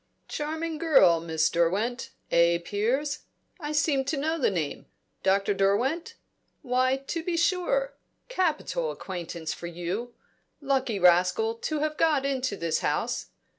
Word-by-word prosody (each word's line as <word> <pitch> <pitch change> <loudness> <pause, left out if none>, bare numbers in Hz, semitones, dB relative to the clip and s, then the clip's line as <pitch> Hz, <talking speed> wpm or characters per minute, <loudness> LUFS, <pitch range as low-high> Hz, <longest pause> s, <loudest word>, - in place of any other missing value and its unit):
"Charming 315 +1 -3
girl, 265 - +5
Miss 160 -1 +1
Derwent 200 +9 0 0.2
eh, 170 0 +4
Piers? 255 +8 0 0.4
I 300 -2 -4
seem 290 -2 +2
to 290 +2 -1
know 320 +4 -1
the - - +3
name 160 -7 -3 0.3
Dr. 195 +1 +2
Derwent? 220 - 0 0.5
Why, 255 +1 +2
to 275 +5 -4
be 340 0 -1
sure! 400 +8 +1 0.3
Capital - - -1
acquaintance 170 - -5
for 170 - -7
you. 180 +8 -4 0.4
Lucky 270 -6 0
rascal, 180 +5 +4
to 295 +6 -3
have 305 0 -1
got 300 -4 +2
into 260 -6 -1
this 170 -2 0
house. - - -1
255 Hz, 130 wpm, -27 LUFS, 185-310 Hz, 0.5 s, girl